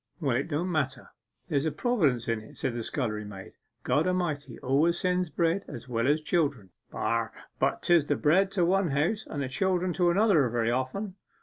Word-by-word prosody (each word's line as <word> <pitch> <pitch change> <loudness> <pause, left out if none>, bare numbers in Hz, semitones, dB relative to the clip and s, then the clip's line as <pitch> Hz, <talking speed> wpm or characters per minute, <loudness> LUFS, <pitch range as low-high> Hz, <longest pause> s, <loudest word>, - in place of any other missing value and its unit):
'Well, 140 -7 0
it 135 - -1
don't 170 +4 -1
matter; 135 -6 -2 0.4
there's 145 -2 0
a 160 - +1
Providence 150 - +1
in 115 -1 0
it,' 110 - -14
said 120 - -2
the 120 - -3
scullery 110 -3 -2
maid. 100 -2 -10 0.3
'God 155 +4 +2
A'mighty 175 -6 -2
always 145 +6 +2
sends 180 -1 0
bread 170 +5 0
as 120 - -8
well 115 0 0
as 150 +2 +2
children.' 140 - 0 0.2
'But - - -2
'tis 170 -4 +4
the 145 - +2
bread 185 +8 +3
to 180 -3 +2
one 190 0 +2
house 160 +10 0
and 145 -2 -3
the - - -2
children 180 +5 0
to 175 0 +2
another 175 - +4
very 115 0 0
often. 180 - -3
150 Hz, 190 wpm, -28 LUFS, 130-180 Hz, 0.4 s, tis